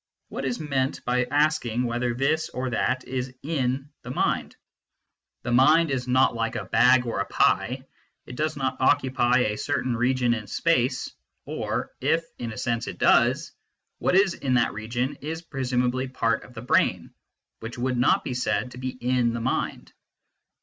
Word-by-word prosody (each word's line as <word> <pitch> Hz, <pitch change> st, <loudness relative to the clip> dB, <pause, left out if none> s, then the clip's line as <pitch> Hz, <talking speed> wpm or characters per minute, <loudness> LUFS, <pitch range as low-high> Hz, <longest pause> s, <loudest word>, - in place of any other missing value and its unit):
What -, -, -5 dB
is 125 Hz, -2 st, -2 dB
meant 140 Hz, -3 st, -2 dB
by 125 Hz, 0 st, +1 dB
asking 145 Hz, -6 st, +1 dB
whether 120 Hz, 0 st, -1 dB
this 150 Hz, +5 st, 0 dB
or 130 Hz, 0 st, -3 dB
that 130 Hz, +2 st, 0 dB
is 130 Hz, 0 st, -4 dB
" -, -, -46 dB
in 135 Hz, -3 st, -1 dB
" -, -, -56 dB
the -, -, -9 dB
mind? 125 Hz, -, -1 dB, 0.9 s
The 120 Hz, -, -3 dB
mind 150 Hz, +6 st, +5 dB
is 125 Hz, -2 st, -2 dB
not 130 Hz, +1 st, +3 dB
like 115 Hz, -1 st, -2 dB
a -, -, -3 dB
bag 125 Hz, 0 st, +4 dB
or 115 Hz, -4 st, -2 dB
a 100 Hz, -, 0 dB
pie; 130 Hz, +2 st, +1 dB, 0.4 s
it 125 Hz, -, -9 dB
does 155 Hz, +2 st, -1 dB
not 135 Hz, -1 st, -1 dB
occupy 130 Hz, -2 st, +3 dB
a 105 Hz, -3 st, -1 dB
certain 130 Hz, -4 st, -1 dB
region 125 Hz, 0 st, +2 dB
in 110 Hz, -3 st, -5 dB
space, 135 Hz, -7 st, 0 dB, 0.3 s
or, -, -, -3 dB
if 165 Hz, +1 st, +2 dB, 0.2 s
(in 115 Hz, -1 st, -4 dB
a 110 Hz, -, -8 dB
sense) 115 Hz, +1 st, -1 dB
it -, -, -6 dB
does, -, -, +3 dB, 0.5 s
what -, -, +1 dB
is 195 Hz, -2 st, +4 dB
in 130 Hz, -5 st, -1 dB
that 120 Hz, -, +2 dB
region 120 Hz, +5 st, -3 dB
is 160 Hz, +3 st, -5 dB
presumably 130 Hz, -3 st, -1 dB
part 115 Hz, -3 st, 0 dB
of 125 Hz, -, -16 dB
the 115 Hz, -, -7 dB
brain, 125 Hz, -, +1 dB, 0.5 s
which 115 Hz, +2 st, -7 dB
would 125 Hz, +1 st, -1 dB
not 125 Hz, -, +3 dB
be 130 Hz, -, -3 dB
said 115 Hz, -1 st, -1 dB
to 125 Hz, -, -10 dB
be 130 Hz, 0 st, -3 dB
in 125 Hz, -1 st, 0 dB
the 120 Hz, -, -3 dB
mind. 115 Hz, -, -2 dB
125 Hz, 180 wpm, -25 LUFS, 120-135 Hz, 0.9 s, mind